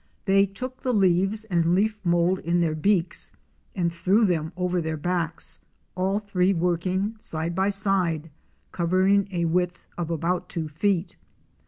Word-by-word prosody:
They 195 0 +4
took 255 +7 -7
the 255 - 0
leaves 195 +2 +2
and 175 -4 +1
leaf 210 +1 0
mould 175 +1 +2
in 170 +1 0
their 165 -2 +1
beaks 180 +2 0 0.4
and 170 -3 0
threw 190 +6 +3
them 160 -4 0
over 180 -1 0
their 160 -1 -3
backs, 170 0 -2 0.3
all 190 +2 0
three 195 -2 +1
working 180 +5 0
side 160 -2 -2
by 190 +3 +1
side, 185 -6 0 0.4
covering 185 +3 +2
a 170 -2 0
width 175 +1 -1
of 170 -2 -2
about 175 +2 -1
two 165 -3 -3
feet. 180 +4 -1
180 Hz, 150 wpm, -25 LUFS, 170-195 Hz, 0.4 s, They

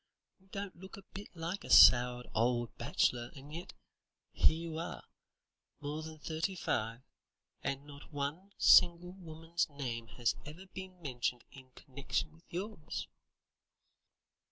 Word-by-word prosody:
You 190 - -26
don't 200 0 -6
look 190 +3 -11
a 200 - -11
bit 200 +1 -7
like 170 +4 -4
a - - -9
soured 125 0 +8
old 120 +1 +1
bachelor, 120 -1 +1
and 140 +2 -11
yet 170 +2 -7 0.6
here 160 - +4
you 160 - -4
are, 170 - -5 0.8
more 150 +2 -4
than 160 0 -8
thirty 160 +4 -2
five, 115 -6 -2 0.6
and 140 +1 -3
not 145 +1 -12
one 150 +7 -4
single 175 +1 +6
woman's 165 -2 -3
name 120 -5 -4
has 120 +1 0
ever 160 +6 -10
been 190 -1 -9
mentioned 125 -3 -2
in 130 -2 -14
connection 140 +3 -3
with 165 +2 -22
yours." 185 -2 -5
155 Hz, 135 wpm, -34 LUFS, 130-175 Hz, 0.8 s, soured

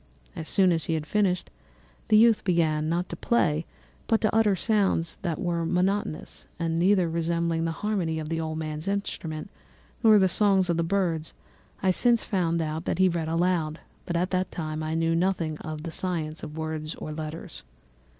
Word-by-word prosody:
So 165 - -4
soon 185 +3 +3
as 165 -2 0
he 165 - 0
had 155 -1 -3
finished, 190 0 0 0.6
the 215 - +5
youth 225 0 +5
began, 160 -4 +1
not 175 +2 0
to - - -4
play, 165 -6 +1 0.4
but 225 - +3
to 215 - +1
utter 215 -3 +4
sounds 195 -5 +1
that 170 -4 -2
were 170 -2 -1
monotonous, 180 0 -1
and 165 -1 -1
neither 185 0 +4
resembling 165 0 0
the 165 - 0
harmony 180 -7 0
of 155 -1 -4
the 165 +1 -2
old 160 0 -3
man's 155 +1 -4
instrument 195 -4 -3 0.5
nor 220 -2 +7
the 190 -2 +5
songs 190 -1 +3
of 170 - 0
the 170 - +1
birds; 165 -3 -1 0.5
I 190 - +4
since 235 +4 +3
found 170 -4 0
that 160 +1 -2
he 185 0 +4
read 165 -2 -2
aloud, 165 -2 0 0.3
but 170 - -1
at 180 +2 0
that 185 0 0
time 155 -2 -4
I 155 +1 -2
knew 165 0 +1
nothing 165 -3 0
of 155 -1 -6
the 165 - -5
science 160 -3 -3
of 150 +1 -8
words 155 -1 -4
or 155 - -7
letters. 155 +1 -7
170 Hz, 185 wpm, -26 LUFS, 160-190 Hz, 0.6 s, nor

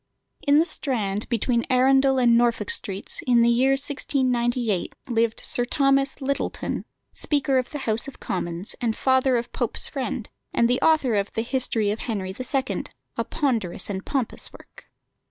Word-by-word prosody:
In 285 +1 +6
the 320 - +5
Strand, 215 - -2
between 235 0 +1
Arundel 265 +1 +4
and 240 -2 +5
Norfolk 235 -3 +2
Streets, 195 0 -2
in 240 -2 +5
the 235 - +4
year 255 +3 +4
1698, 250 - +1
lived 230 -2 0
Sir 245 - -1
Thomas 275 +1 +2
Lyttelton, 275 0 -2 0.3
Speaker 275 -3 +1
of 250 - -4
the 295 - -5
House 220 +2 +1
of 275 - -10
Commons, 175 +2 -3
and 230 -2 0
father 260 -1 +3
of 235 - -5
Pope's - - +1
friend, - - -4 0.3
and 235 - +4
the 245 +1 +1
author 310 -7 +3
of 200 -1 0
the 225 - -1
History 230 -4 0
of 215 - -3
Henry 200 -5 -3
the 255 - -6
Second, 265 +1 -2 0.3
a - - -1
ponderous 230 - -1
and 190 0 -4
pompous 265 -5 -2
work. - - -16
245 Hz, 165 wpm, -24 LUFS, 225-270 Hz, 0.3 s, In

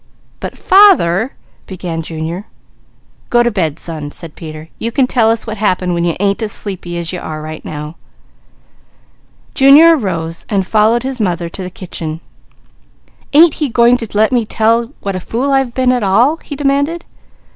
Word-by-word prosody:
"But - - -6
father 270 - +4 0.2
" - - -36
began 175 -3 -5
Junior. 165 +4 -5 0.8
"Go 240 0 +4
to 240 - +1
bed 160 -8 -1
son," 155 -3 -6
said 160 +1 -7
Peter. 155 -1 -9
"You 230 - -2
can 260 +2 +2
tell 235 -3 +2
us 225 0 0
what 220 -1 -5
happened 185 -3 0
when 170 0 -1
you 170 -1 0
ain't 200 +2 0
as 215 -2 -2
sleepy 175 -4 -4
as 170 +1 -3
you 180 - -4
are 155 -2 -6
right 155 0 -8
now." 150 +1 -7 1.6
Junior 300 +5 +7
arose 170 - -3
and 195 -4 0
followed 220 +4 +2
his 265 -1 -4
mother 175 -4 -1
to 190 - -7
the 180 - -5
kitchen. 165 -3 -6 1.1
"Ain't 315 +2 +6
he 295 - +1
going 235 +1 +4
to 230 - -4
let 220 +3 +3
me 245 -2 +2
tell 230 +2 +1
what 195 -1 -3
a - - -2
fool 245 +9 -2
I've 270 -3 +1
been 255 -1 +2
at 250 -1 0
all?" 230 +10 +3
he 295 - -8
demanded. 285 +4 0
210 Hz, 180 wpm, -15 LUFS, 170-250 Hz, 1.6 s, Junior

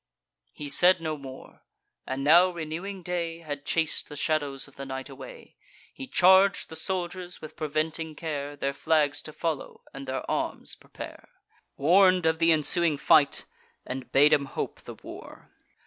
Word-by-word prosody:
He 150 - -7
said 180 +6 +5
no 160 -2 -3
more. 135 -2 -11 0.5
And 130 +1 -3
now 170 +5 +7
renewing 175 +3 -6
day 170 -1 -3
Had 145 -3 -6
chas'd 165 -2 0
the 145 - -8
shadows 145 -3 -1
of 140 - -18
the 135 - -7
night 135 -1 -6
away. - - -12 0.4
He 270 - -8
charg'd 190 -2 +4
the 160 - -8
soldiers, 180 +1 -4
with 155 - -10
preventing 155 +1 -2
care, 145 -2 -4
Their 140 -1 -2
flags 150 -1 +1
to 155 - -9
follow, 160 -2 -4
and 135 0 -8
their 130 0 -3
arms - - -3
prepare; - - -11 0.5
Warn'd 185 +4 +5
of 160 0 +2
th' 165 0 +4
ensuing 160 0 +2
fight, 145 0 +4 0.4
and 130 -1 -6
bade 145 +2 +6
'em 140 -1 +3
hope 135 - -5
the - - -10
war. - - -12
155 Hz, 160 wpm, -27 LUFS, 145-175 Hz, 0.5 s, now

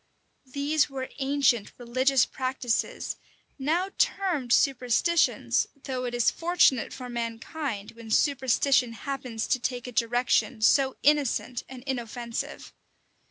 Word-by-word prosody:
These 290 +2 +1
were 265 -1 -5
ancient 270 -5 +1
religious 255 +2 +2
practices, 255 -3 -2 0.4
now 340 +8 0
termed 345 -11 0
superstitions; 270 +6 +2 0.2
though 255 -2 -3
it 240 -1 -3
is 240 -2 +3
fortunate 330 -8 +2
for 250 -1 -7
mankind, 230 0 -4
when 230 -1 -12
superstition 260 -1 +2
happens 250 -1 -4
to 255 - +1
take 245 0 -3
a 250 - -6
direction 240 0 +1
so 265 +3 +4
innocent 280 -4 +1
and 255 -2 -10
inoffensive. 240 -3 -5
255 Hz, 115 wpm, -27 LUFS, 240-280 Hz, 0.4 s, so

